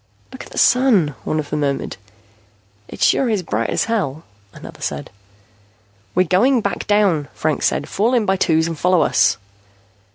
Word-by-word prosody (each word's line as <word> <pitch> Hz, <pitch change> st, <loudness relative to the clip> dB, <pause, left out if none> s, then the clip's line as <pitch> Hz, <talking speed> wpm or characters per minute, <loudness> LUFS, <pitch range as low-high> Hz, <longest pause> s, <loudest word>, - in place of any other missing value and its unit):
"Look 260 Hz, -, -9 dB
at -, -, -14 dB
the -, -, -10 dB
Sun," 230 Hz, -, +3 dB
one 155 Hz, -, -1 dB
of 145 Hz, -2 st, -6 dB
them 150 Hz, -, -1 dB
murmured. 140 Hz, -2 st, -2 dB, 0.9 s
"It -, -, -5 dB
sure 265 Hz, -, +3 dB
is 210 Hz, -5 st, -1 dB
bright 115 Hz, -6 st, -2 dB
as -, -, 0 dB
hell," 165 Hz, -10 st, -2 dB, 0.3 s
another -, -, -12 dB
said. 70 Hz, 0 st, -4 dB, 1.0 s
"We're 180 Hz, -, +4 dB
going 225 Hz, -, +3 dB
back 200 Hz, -, -3 dB
down," 200 Hz, -9 st, +2 dB
Franks 155 Hz, -1 st, 0 dB
said. 145 Hz, -, -2 dB
"Fall 230 Hz, +6 st, 0 dB
in 230 Hz, -3 st, +1 dB
by 190 Hz, -, +2 dB
twos 160 Hz, -3 st, +2 dB
and 165 Hz, 0 st, -3 dB
follow 180 Hz, -1 st, +3 dB
us." -, -, +2 dB
180 Hz, 170 wpm, -19 LUFS, 150-215 Hz, 1.0 s, We're